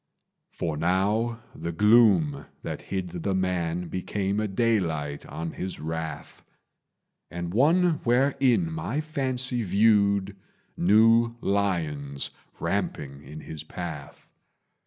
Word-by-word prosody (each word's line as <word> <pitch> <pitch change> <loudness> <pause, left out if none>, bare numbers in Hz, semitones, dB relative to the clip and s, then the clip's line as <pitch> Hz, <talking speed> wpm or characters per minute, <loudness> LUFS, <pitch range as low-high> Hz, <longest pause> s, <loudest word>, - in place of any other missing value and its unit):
For 80 -3 -3
now 105 +7 0
the 85 - -5
gloom 95 -7 +4 0.2
that - - -5
hid 95 -2 -4
the 90 +3 -2
man 90 -2 -1
Became 100 +3 -2
a 110 - 0
daylight 90 -10 -1
on 80 0 -5
his 95 0 -5
wrath, 80 -1 -5 0.9
And 85 0 -5
one 160 - +3
wherein 135 +5 +2
my 160 -2 -2
fancy 130 -5 -1
viewed 100 -1 +3 0.4
New 115 +5 +4
lions 80 -10 -1 0.3
ramping 70 -1 -3
in 75 +3 -10
his 80 -1 -8
path. 80 -3 -8
95 Hz, 105 wpm, -26 LUFS, 80-115 Hz, 0.9 s, gloom